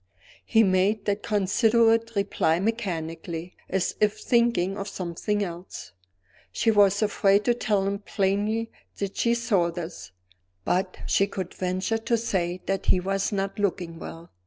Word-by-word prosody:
He 225 -1 +4
made 195 +2 +2
that 205 0 0
considerate 225 +2 +2
reply 170 -4 +1
mechanically, 175 -5 -3
as 190 -1 0
if 210 0 +3
thinking 235 -6 +2
of 200 0 -5
something 195 +3 -2
else. 175 - -7 0.6
She 225 - +2
was 205 0 +4
afraid 200 -1 +3
to 240 - +4
tell 210 -4 0
him 200 0 -1
plainly 205 +3 -1 0.3
that 200 -1 -3
she 235 0 +2
saw 200 -7 +1
this; 165 - -7 0.5
but 185 +1 0
she 195 - +2
could 190 -3 -5
venture 185 +4 -1
to 230 +1 +1
say 185 -5 -1
that 195 -1 -2
he 185 - +4
was 195 +3 -1
not 195 0 -2
looking 175 -4 -2
well. 165 0 -9
195 Hz, 145 wpm, -26 LUFS, 180-215 Hz, 0.6 s, He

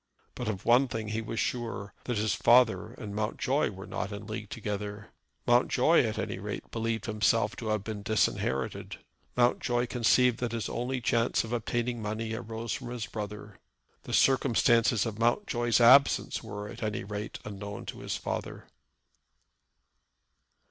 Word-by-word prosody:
But - - -5
of 100 -3 -3
one 125 +3 +5
thing 110 -3 -4
he 110 +1 -2
was 115 0 -4
sure, 115 -5 -3
that 120 -3 -1
his 105 +1 +1
father 120 -2 +4
and 105 -5 -7
Mountjoy 110 +7 0
were 95 0 -9
not 95 - -4
in 100 0 -7
league 110 -1 -6
together. 105 -1 -5 0.3
Mountjoy 125 +6 +4
at 110 -1 -2
any 100 -3 -3
rate 105 +1 -6
believed 115 0 -2
himself 105 0 +1
to 115 - -5
have 110 -2 0
been 105 -1 -5
disinherited. 100 -10 -1 0.4
Mountjoy 120 0 +2
conceived 125 0 +3
that 120 -2 -2
his 115 -2 -2
only 125 +2 -2
chance 115 0 +2
of 115 +1 -6
obtaining 120 0 -1
money 110 +1 -3
arose 115 0 -4
from - - -5
his 120 -3 -4
brother. 105 -1 -7 0.4
The - - -7
circumstances 120 -4 +4
of 110 -2 -4
Mountjoy's 120 - +2
absence 130 +4 +5
were, 105 0 -6
at 115 +2 -9
any 110 -3 -2
rate, 105 +2 -5
unknown 100 0 -7
to - - -7
his - - -3
father. - - -5
115 Hz, 155 wpm, -29 LUFS, 105-120 Hz, 0.4 s, one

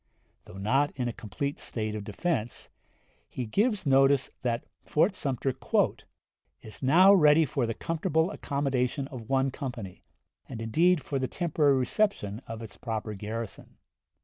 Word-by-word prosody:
Though 95 - -11
not 135 +9 +2
in 125 -2 -2
a 120 - -3
complete 115 +6 -4
state 110 -2 -3
of 105 -1 -4
defense, 115 - -3 0.6
he 125 - -4
gives 205 - +1
notice 135 0 +4
that 120 -2 -1 0.2
Fort 165 +6 +2
Sumter 135 -6 -2 1.1
"is 110 - -9
now 180 +9 +7
ready 155 -3 +6
for 130 -3 -1
the 115 - -3
comfortable 160 - 0
accommodation 135 -4 -1
of 120 -5 -9
one 135 0 +2
company, 120 -9 -6 0.5
and 120 - -6
indeed 160 +9 +2
for 140 - -2
the 130 - -1
temporary 150 -3 +2
reception 125 - 0
of 115 0 -6
its 105 -3 -10
proper 110 -2 -4
garrison. 110 +2 -7
130 Hz, 145 wpm, -28 LUFS, 115-150 Hz, 1.1 s, now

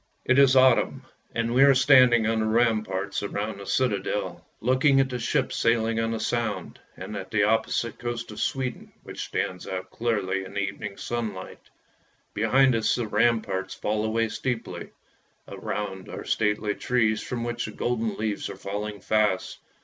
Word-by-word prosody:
IT 130 +2 +4
is 135 -1 +6
autumn, 130 -2 +4 0.3
and 115 0 0
we 130 - +4
are 140 -1 +7
standing 125 -4 +6
on 115 0 +1
the 110 - +1
ramparts 110 -4 0
round 100 0 -4
the 100 - -9
citadel, 100 -6 -1 0.2
looking 130 +3 +3
at 135 -1 +2
the 125 -1 -4
ships 130 +3 0
sailing 115 -1 +1
on 115 0 0
the 115 0 -2
Sound, 115 -1 -2 0.2
and 105 - -7
at 95 -2 -6
the 105 -2 +2
opposite 110 +2 0
coast 120 -1 -4
of 105 - -8
Sweden 130 -2 -3
which - - -6
stands 90 -1 -3
out 95 -1 -5
clearly 100 -5 -1
in 95 - -10
the - - 0
evening 100 0 -4
sun 115 -4 -3
light. 95 - -10 0.6
Behind 130 +5 +3
us 115 -1 +2
the 120 - -2
ramparts 105 -3 0
fall 105 0 -1
away 110 +1 0
steeply; 120 0 -4 0.6
around 95 -3 -5
are - - -7
stately 105 -1 0
trees 115 -2 +1
from 120 -2 -4
which 120 0 -3
the 110 - -6
golden 115 -1 -2
leaves 105 -1 -2
are - - -6
falling 105 0 -5
fast. 105 -4 0
110 Hz, 170 wpm, -26 LUFS, 105-120 Hz, 0.6 s, are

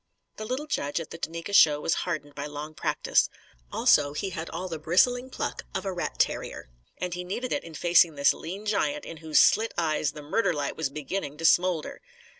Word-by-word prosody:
The 215 - -5
little 255 +6 -3
judge 145 - -2
at 165 - -7
the 165 - -8
Duneka 170 +4 -5
show 150 -6 +6
was 160 - 0 0.2
hardened 150 -4 -4
by 140 +1 -5
long 150 +1 -7
practice. - - +1 0.4
Also, 145 -1 +4
he 190 +5 -3
had 165 -1 -5
all 180 +3 -4
the 165 -3 -5
bristling 245 +11 +2
pluck - - -4
of - - -2
a 190 - -2
rat 175 - -4
terrier. - - -1 0.3
And 180 -1 -3
he 180 +1 -4
needed 240 +8 -4
it - - -1
in 165 -2 -10
facing 170 -2 +4
this 140 0 +4
lean 195 +6 -7
giant 285 +8 0
in 165 - -8
whose 155 -1 +2
slit 225 +1 +4
eyes 155 -3 0
the 150 - -9
murder 180 +5 +1
light 145 -2 -3
was 160 -4 -1
beginning 150 +1 -4
to 165 - -4
smoulder. 175 -2 +2
165 Hz, 210 wpm, -27 LUFS, 150-195 Hz, 0.4 s, show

